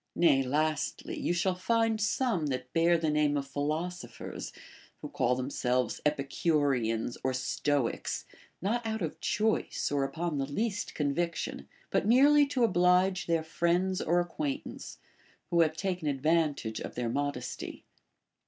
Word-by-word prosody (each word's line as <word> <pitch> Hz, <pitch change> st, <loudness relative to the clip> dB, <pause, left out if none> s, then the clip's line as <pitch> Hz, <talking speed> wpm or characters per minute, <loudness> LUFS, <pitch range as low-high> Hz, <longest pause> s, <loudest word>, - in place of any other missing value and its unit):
Nay, 150 Hz, -6 st, +4 dB
lastly, 155 Hz, +3 st, -1 dB
you -, -, 0 dB
shall 175 Hz, +2 st, +1 dB
find 225 Hz, +3 st, +1 dB
some 205 Hz, -, +1 dB
that 130 Hz, -2 st, -4 dB
bear 170 Hz, +1 st, +4 dB
the 160 Hz, -2 st, 0 dB
name 150 Hz, -1 st, +2 dB
of 140 Hz, -, -2 dB
philosophers, 155 Hz, +6 st, -4 dB, 0.5 s
λνΐιο -, -, -7 dB
call 125 Hz, +1 st, +2 dB
themselves 125 Hz, -2 st, -1 dB
Epicureans 140 Hz, -5 st, 0 dB
or 130 Hz, -, +1 dB
Stoics, 135 Hz, 0 st, -1 dB, 0.4 s
not 235 Hz, +5 st, 0 dB
out 220 Hz, -3 st, -2 dB
of 160 Hz, -, -4 dB
choice, 220 Hz, -7 st, 0 dB
or 140 Hz, -1 st, +1 dB
upon 160 Hz, +1 st, -2 dB
the 135 Hz, -, -1 dB
least 205 Hz, +7 st, -2 dB
conviction, 165 Hz, +4 st, -2 dB, 0.2 s
but -, -, +1 dB
merely 285 Hz, +5 st, +6 dB
to 265 Hz, -3 st, 0 dB
oblige 180 Hz, -1 st, +3 dB
their 165 Hz, -1 st, +1 dB
friends 175 Hz, +3 st, +1 dB
or 175 Hz, +2 st, +2 dB
acquaintance, 155 Hz, -5 st, -4 dB, 0.5 s
who 170 Hz, -1 st, +4 dB
have 160 Hz, -1 st, +2 dB
taken 180 Hz, -5 st, -2 dB
advantage 145 Hz, -5 st, +1 dB
of -, -, -6 dB
their 125 Hz, -1 st, -2 dB
modesty. 125 Hz, -1 st, -4 dB
160 Hz, 135 wpm, -30 LUFS, 140-180 Hz, 0.5 s, merely